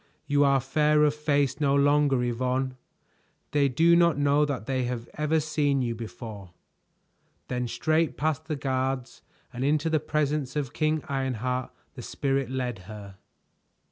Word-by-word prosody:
"You 145 0 +3
are 140 -1 +4
fair 150 +3 +2
of 150 -1 +3
face 145 -2 0
no 140 -1 +3
longer, 140 -2 +3
Yvonne. 130 +2 -1 0.8
They 140 -1 +3
do 165 +6 +4
not 170 -3 +4
know 145 +1 +3
that 135 -7 -4
they 130 -1 -1
have 120 -1 -4
ever 150 +1 +1
seen 145 -3 0
you 120 -1 -1
before." 110 -3 -8 1.0
Then 125 -1 -2
straight 160 +5 0
past 155 0 -1
the 155 - -2
guards 130 -2 -2 0.3
and 125 +1 -4
into 155 +3 +1
the 155 - +3
presence 150 -3 -1
of 140 -5 -2
King 155 -1 0
Ironheart 130 -2 -2 0.2
the 130 - -9
Spirit 135 +1 -1
led 125 -4 -3
her. 100 -3 -10
140 Hz, 150 wpm, -27 LUFS, 125-150 Hz, 1.0 s, are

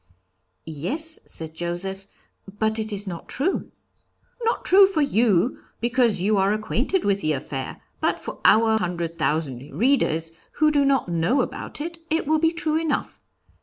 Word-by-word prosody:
'Yes,' 270 - -3
said 160 -1 -7
Joseph, 175 +4 -4 0.5
'but 220 +1 +1
it 220 0 -2
is 205 0 -1
not 175 -3 -7
true.' 310 +8 -1 0.7
'Not 460 - 0
true 390 +1 +7
for 380 -6 0
you, 230 -5 +2 0.2
because 235 -4 +2
you 205 +2 +2
are 195 +1 +3
acquainted 240 - -1
with 200 0 +1
the 155 -2 +1
affair; 135 -1 -5 0.2
but - - 0
for - - -7
our 220 0 +5
hundred 170 -2 -3
thousand 150 -5 0
readers, 185 - +1 0.2
who 305 0 +3
do 285 -2 +3
not 275 -6 +2
know 175 +11 +1
about - - -6
it, 335 +3 -5
it 320 +1 0
will 310 +2 +2
be 325 +1 +3
true 320 -2 0
enough. 320 -3 -2
220 Hz, 160 wpm, -24 LUFS, -, 0.7 s, true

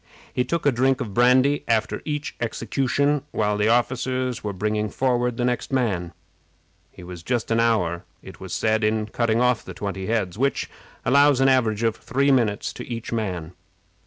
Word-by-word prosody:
He 125 - +1
took 170 +4 -2
a 145 - +5
drink 130 +1 +2
of 105 - -5
brandy 130 +5 +4
after 110 -2 0
each 150 -1 -3
execution 135 +5 0
while 105 0 0
the 105 +1 +1
officers 125 +1 0
were 105 - -2
bringing 105 +2 -1
forward 125 0 0
the 120 - 0
next 125 0 -2
man. 100 -10 0 0.8
He - - -14
was 90 -1 -9
just 120 +5 -2
an 115 - +3
hour, 100 -8 +1 0.2
it 95 - -12
was 95 -1 -8
said, 110 +2 +1
in 110 0 +1
cutting 115 +1 0
off 125 -2 +2
the 95 - -9
twenty 95 -1 -4
heads, 110 -4 -1
which 140 +1 0 0.4
allows 140 +1 +5
of 135 - +4
an 135 - +6
average 115 -4 +1
of 115 -1 +1
three 140 +2 +1
minutes 115 -5 +1
to - - -8
each 115 -2 -5
man. 90 -7 -3
115 Hz, 185 wpm, -23 LUFS, 105-130 Hz, 0.8 s, an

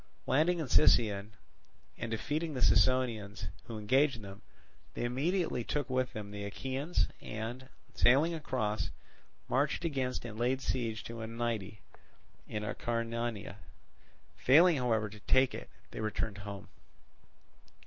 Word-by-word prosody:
Landing 160 +7 +3
in 160 -4 -2
Sicyon 105 -6 +4 0.6
and 115 - -5
defeating 150 +7 -2
the 125 - +1
Sicyonians 115 -6 +2 0.2
who 115 - -6
engaged 130 +2 +2
them, 100 0 -10 0.5
they - - -2
immediately 135 +2 0
took 145 +2 -2
with 130 0 0
them 105 -1 -6
the 100 0 -5
Achaeans 135 - -1
and, 120 +4 -6 0.2
sailing 145 +7 +4
across, 125 -9 -1 0.6
marched 140 +5 +1
against 130 -6 -1
and 110 -1 -7
laid 125 +2 +2
siege 115 -4 -2
to 115 0 -7
Oeniadae 110 -3 -3 0.7
in 105 0 -3
Acarnania. 115 0 -3 0.8
Failing 160 +5 +6
however 115 -4 +1
to 105 +1 -11
take 130 +4 +3
it, - - -7 0.2
they - - -5
returned 110 -1 -2
home. 100 0 -7
120 Hz, 125 wpm, -32 LUFS, 110-135 Hz, 0.8 s, Failing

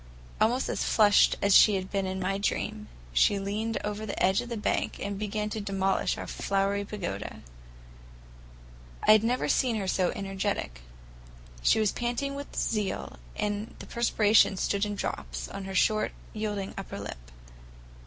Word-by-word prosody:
Almost 240 +4 +2
as - - -1
flushed 210 -2 +5
as 200 -1 +5
she 210 - +7
had 190 0 -4
been 195 -1 0
in 190 0 -3
my 195 +1 -1
dream, 215 +1 -2 0.3
she 130 - +4
leaned 210 +3 -2
over 210 +1 -3
the 220 - -4
edge 190 +1 +3
of 245 - -8
the 235 - -3
bank 210 - -1
and 200 -1 -4
began 210 0 -2
to 215 - -3
demolish 195 -1 0
our - - -5
flowery 200 +1 0
pagoda. 170 - -5 1.7
I - - +9
had 215 0 +6
never 245 +2 +1
seen 245 -3 +2
her 200 -3 -2
so 185 -1 +1
energetic; 195 - -3 0.8
she 140 - +4
was 215 -2 +2
panting 245 +4 -2
with 280 +1 -7
zeal, 210 - -2 0.2
and 210 +1 -3
the - - -9
perspiration 215 -4 +3
stood 200 +2 0
in 205 0 -3
drops 60 - -4
on 195 - -6
her 195 0 -6
short, 215 +3 +2 0.2
yielding 210 -2 -3
upper - - -7
lip. - - -8
205 Hz, 165 wpm, -28 LUFS, 195-215 Hz, 1.7 s, I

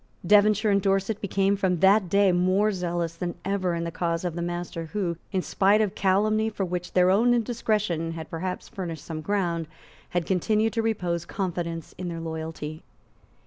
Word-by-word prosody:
Devonshire 210 +2 +5
and 200 0 +3
Dorset 195 +2 0
became 195 0 +1
from 190 -2 +1
that 190 +2 +4
day 200 0 +4
more 185 +4 +2
zealous 175 -3 -2
than 175 +1 -4
ever 185 -3 0
in 170 - -2
the 170 - -3
cause 170 0 -2
of 175 - -1
the 170 - -4
master 175 -1 -4
who, 180 -2 -2 0.2
in 190 -3 0
spite 200 +2 +3
of 210 -3 +1
calumny 215 +3 +2
for 205 -3 -3
which 180 0 -4
their 180 0 +5
own 235 +5 +4
indiscretion 215 -8 -1
had 160 -1 -7
perhaps 180 +3 -4
furnished 165 -6 -6
some 155 -2 -5
ground, 170 -4 -1 0.4
had 175 -2 -1
continued 215 +5 +1
to 225 - +1
repose 180 -7 -1
confidence 170 -3 -4
in 180 - -3
their 170 -1 -4
loyalty. 160 -1 -5
185 Hz, 180 wpm, -26 LUFS, 170-205 Hz, 0.4 s, Devonshire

